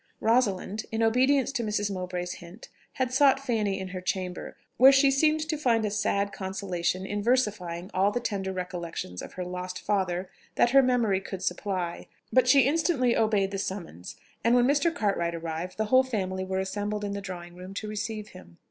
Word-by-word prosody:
Rosalind, 220 -3 +1
in 225 0 0
obedience 260 +4 +3
to 260 -4 -2
Mrs. 205 -1 -1
Mowbray's 180 -1 -4
hint, 175 +6 -12 0.2
had 255 -1 -1
sought 270 0 +5
Fanny 220 -7 -1
in 190 -1 -5
her 185 0 -6
chamber, 180 -1 -4 0.2
where 265 +2 +9
she 275 0 +5
seemed 310 +3 +2
to 310 0 -1
find 230 -6 +2
a 210 - -1
sad 200 -1 0
consolation 190 -1 -2
in 205 +1 -3
versifying 200 -7 0
all 190 +2 +3
the 245 - -2
tender 200 -5 -3
recollections 175 - -5
of - - -9
her 180 - -5
lost 180 0 -5
father 185 -2 -1 0.3
that 240 - +3
her 275 +1 +7
memory 235 -7 +2
could 190 -1 -7
supply; 180 -2 -3 0.3
but 255 -1 +4
she 275 +2 +7
instantly 280 -3 +2
obeyed 210 -3 +2
the 195 - -3
summons, 175 - -6 0.3
and 235 +1 +4
when 245 -1 +5
Mr. 290 +5 +3
Cartwright 185 - -1
arrived, 165 +2 -5
the 220 - 0
whole 260 - +8
family 190 -7 -2
were 190 0 -3
assembled 205 +2 -3
in 200 - -3
the 200 0 -4
drawing 175 -3 -8
room 185 +2 -10
to 215 - -4
receive 215 0 -4
him. 85 - -15
200 Hz, 190 wpm, -27 LUFS, 185-240 Hz, 0.3 s, where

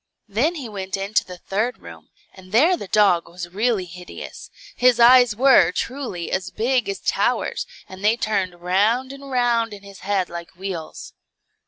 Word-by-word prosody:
Then 245 - 0
he 280 -7 -6
went 195 -3 -5
into 195 +3 0
the 180 -1 -10
third 215 +7 -2
room, - - -13 0.2
and 185 -1 -15
there 305 - +5
the 205 - -8
dog 185 -4 +3
was 175 0 -7
really 215 -2 +1
hideous; 180 +1 -10 0.3
his 245 -1 +4
eyes 245 -1 +7
were, 260 -4 +5
truly, 235 -5 -4
as 190 -1 -2
big 245 - 0
as 395 - -2
towers, - - 0 0.2
and 190 +1 -11
they 215 +3 +3
turned 195 -6 -1
round 215 +9 +1
and 275 0 -11
round 235 -4 +1
in 200 - -14
his 200 -1 -13
head 195 -2 -1
like 170 +2 -9
wheels. 180 -4 -7
205 Hz, 170 wpm, -22 LUFS, 185-245 Hz, 0.3 s, eyes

